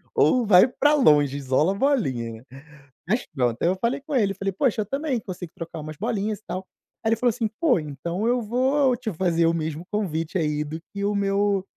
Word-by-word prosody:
Ou 250 -3 +3
vai 195 +3 +7
pra 290 +4 +2
longe, 145 - +4
isola 140 +6 +1
a - - -6
bolinha. 130 - -1 0.6
Mas 220 +6 0
pronto. 120 -4 0
Aí - - +2
eu 185 - +1
falei 235 +4 0
com 290 0 -5
ele, 205 -5 +2
eu - - -19
falei: 195 0 -2
"Poxa, 225 0 +1
eu - - -3
também 275 +1 -2
consigo 180 -4 -8
trocar 165 -1 -7
umas 155 0 -8
bolinhas 215 -1 -2
e - - -35
tal". 185 +1 -5 0.4
Aí 220 - +1
ele 225 - +3
falou 245 +2 +2
assim: 225 -1 -1
"Pô, 265 - +4
então 170 - -4
eu 245 0 +2
vou 255 +4 +2
te 230 -3 -4
fazer 170 -1 +1
o 165 - +2
mesmo 160 +1 -3
convite 170 -5 -2
aí 150 -2 0
do 160 +2 -7
que 200 0 -3
o 205 - +1
meu 200 -1 +1
195 Hz, 220 wpm, -24 LUFS, 160-235 Hz, 0.6 s, vai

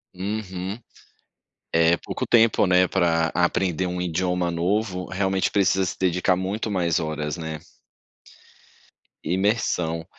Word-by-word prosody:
Uhum. 95 0 -4 0.9
É, 85 +1 +4
pouco - - -5
tempo, 115 -3 +4
né, 90 0 +4
pra 85 -3 +2
aprender 90 0 +1
um 90 0 -3
idioma 90 0 -1
novo, 90 +2 -1
realmente 95 0 0
precisa 95 -1 +2
se 85 - -4
dedicar 90 0 +1
muito 100 +4 -3
mais 85 -5 +1
horas, 75 -1 -3
né. 80 -2 -6 1.6
Imersão. 90 -4 0
90 Hz, 110 wpm, -24 LUFS, 85-95 Hz, 1.6 s, É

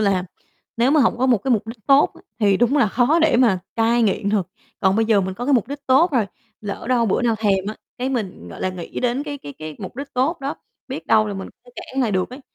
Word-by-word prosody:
là 195 -3 +1 0.5
nếu 240 +3 +3
mà 305 +1 +4
hổng 245 - +2
có 260 - +2
một 240 -5 +4
cái 265 - -3
mục 225 -2 +2
đích 225 -2 -10
tốt 275 +1 +5
á, - - -16 0.2
thì 200 -3 +4
đúng 245 +6 +2
là 235 -8 +4
khó 255 +9 +3
để 320 -5 +3
mà 235 -7 +4 0.2
cai 230 +1 +3
nghiện 200 -1 +1
được. 200 -5 +1 0.3
Còn 190 +2 +3
bây 225 - +3
giờ 215 -3 +3
mình 190 0 -3
có 240 +4 -5
cái 290 - +2
mục 230 -2 +1
đích 285 0 -7
tốt 275 +7 +4
rồi, 230 -6 +2 0.3
lỡ 205 -1 -6
đâu 240 -3 +2
bữa 200 - +1
nào 230 -2 +2
thèm 195 -3 +1
á, 215 - -4 0.2
cái 255 - -1
mình, 205 - -4
gọi 85 - -10
là, - - 0
nghĩ 185 -2 -6
đến 250 +2 0
cái 290 -1 -6
cái 145 - -9
cái 155 -1 -7
mục 195 +3 -8
đích 280 +1 -7
tốt 280 +7 0
đó, 275 +1 -3 0.3
biết - - -6
đâu 215 -1 +4
là 205 - -4
mình 190 - -6 0.2
sẽ 245 - -17
cản 270 - -4
lại 225 - +1
được 185 +3 -1
ấy. 255 - -9
230 Hz, 275 wpm, -21 LUFS, 200-260 Hz, 0.5 s, tốt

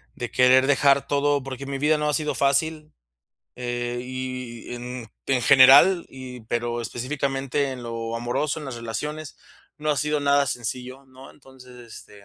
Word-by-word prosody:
de 120 - -5
querer 130 +1 +5
dejar 140 0 +3
todo, 145 -1 +1
porque 135 0 -7
mi 140 0 -3
vida 150 +3 +2
no 150 0 0
ha - - 0
sido 150 +1 -1
fácil, 155 +3 0 0.7
eh, 120 0 -3
y 125 -2 -6
en 120 -2 -7 0.2
en 130 -2 +1
general 135 +8 +7
y 130 -1 -10
pero 120 +1 -2
específicamente 135 +3 -2
en 125 -1 -8
lo 115 -1 -4
amoroso, 120 +6 -2
en 155 - -8
las 130 -3 -6
relaciones, 145 +7 -6 0.4
no 155 0 -1
ha 150 - 0
sido 150 0 0
nada 140 0 +3
sencillo, 125 +2 -5
¿no? 130 +1 -14
Entonces, 130 -2 -17 0.2
este, 100 -1 -14
130 Hz, 160 wpm, -24 LUFS, 120-145 Hz, 0.7 s, general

